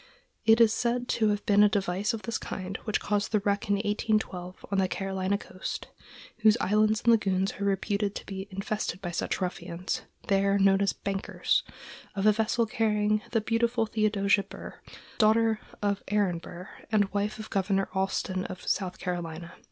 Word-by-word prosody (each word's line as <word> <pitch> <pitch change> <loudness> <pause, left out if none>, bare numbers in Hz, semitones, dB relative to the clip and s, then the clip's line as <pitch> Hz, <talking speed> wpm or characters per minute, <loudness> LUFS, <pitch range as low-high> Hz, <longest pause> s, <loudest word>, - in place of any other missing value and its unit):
It 225 +1 +7
is 225 -2 +6
said 245 +1 0
to 220 - +2
have 205 0 -1
been 205 -2 +5
a 210 - +7
device 195 0 0
of 225 -2 -5
this 230 - -2
kind 185 0 -5
which 215 - 0
caused 205 -1 -1
the 215 - +3
wreck 200 0 0
in 205 - +4
1812, 205 -3 -1
on 195 - +2
the 190 - +3
Carolina 190 +1 -1
coast,—whose 215 +3 -2
islands 215 +2 +2
and 235 - +3
lagoons 195 -4 +2
are 200 - -1
reputed 200 +1 0
to - - -4
have - - -20
been 195 -1 -6
infested 195 -1 -3
by 175 -3 -4
such 170 - -2
ruffians, 180 -1 -3 0.3
there 195 0 +3
known 195 0 +4
as 200 - +3
"bankers,"—of 195 0 -3
a 215 - +8
vessel 220 +2 +1
carrying 215 -1 +1
the 225 -2 +1
beautiful 230 +1 +1
Theodosia 210 -2 +2
Burr, 195 - -10 0.4
daughter 220 0 +4 0.2
of 200 -1 +1
Aaron 200 -5 +1
Burr, 175 +2 -9 0.2
and 205 -2 +2
wife 205 +1 -1
of 215 0 -8
Governor 195 0 +1
Alston 190 -1 -1
of 185 - -8
South 185 -2 -1
Carolina. 170 -2 -5
200 Hz, 170 wpm, -28 LUFS, 190-215 Hz, 0.4 s, a